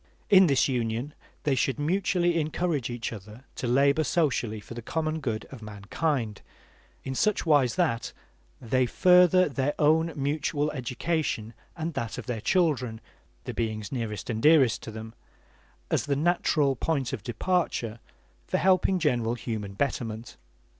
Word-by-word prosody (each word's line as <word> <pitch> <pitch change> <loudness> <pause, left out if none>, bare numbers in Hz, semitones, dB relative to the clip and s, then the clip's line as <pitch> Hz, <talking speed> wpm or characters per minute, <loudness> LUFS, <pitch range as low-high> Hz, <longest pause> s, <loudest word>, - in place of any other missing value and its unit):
In 190 -2 +8
this 140 -3 +3
union 120 +2 -2 0.3
they 145 - +2
should 135 +1 0
mutually 175 +2 +1
encourage 155 -4 -1
each 120 -1 -4
other 110 +4 -11
to 125 - -4
labor 140 +5 +3
socially 130 -9 0
for 105 - -10
the 120 - -7
common 155 +5 -2
good 115 -7 -3
of 130 -4 -10
mankind, 110 +3 -3 0.6
in 130 - -4
such 210 +9 +1
wise 145 -6 +3
that 155 -11 0 0.5
they 130 +1 +1
further 180 +4 +5
their 140 0 -1
own 160 +2 +3
mutual 145 +1 -1
education 125 -3 -2 0.2
and 165 0 -3
that 115 -5 -4
of - - -6
their 120 -4 -3
children, 130 - +1 0.4
the - - -5
beings 110 -2 -3
nearest 110 -6 -4
and 110 0 -3
dearest 145 -6 +5
to - - -8
them, 110 +1 -8 0.8
as - - 0
the 140 - +1
natural 150 -3 +2
point 135 -2 -1
of - - -4
departure 120 - -1 0.5
for - - 0
helping 185 0 +3
general 120 -8 +1
human 110 -4 -5
betterment. 115 -2 -3
135 Hz, 145 wpm, -27 LUFS, 115-160 Hz, 0.8 s, In